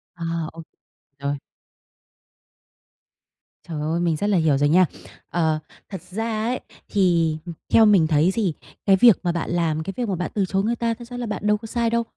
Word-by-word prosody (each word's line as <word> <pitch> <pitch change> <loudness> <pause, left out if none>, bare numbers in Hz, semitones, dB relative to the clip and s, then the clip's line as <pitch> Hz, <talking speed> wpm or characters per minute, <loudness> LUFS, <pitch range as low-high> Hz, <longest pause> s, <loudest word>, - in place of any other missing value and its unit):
À, 170 - -7 0.3
ô 165 - -9 0.6
rồi. 140 0 -3 2.3
Trời 155 -3 -4
ơi! 160 +3 -1
Mình 170 -2 +1
rất 200 +7 -1
là 200 - +3
hiểu 155 -4 +3
rồi 145 +1 +2
nha. 180 +4 +6 0.4
Ờ, 160 -3 +1 0.3
thật 190 -4 -6
ra 215 +4 -3
ấy, 250 +2 -1 0.3
thì, 170 -5 +2
ừm, 170 - -6 0.2
theo 225 - +7
mình 195 -7 +5
thấy 155 +4 +3
thì 200 -7 0 0.3
cái 195 - +6
việc 225 0 +6
mà 175 - +1
bạn 170 -1 -3
làm, 165 -2 0
cái 195 +4 -5
việc 240 -3 -2
mà 190 - 0
bạn 180 0 -3
từ 200 -2 +1
chối 195 +1 0
người 230 +3 0
ta, 230 -1 0
thật 240 +1 -10
ra 245 0 -7
là 245 - -3
bạn 210 -1 -3
đâu 210 0 +4
có 220 - -11
sai 235 +1 0
đâu. 235 0 +1
185 Hz, 205 wpm, -23 LUFS, 165-220 Hz, 2.3 s, theo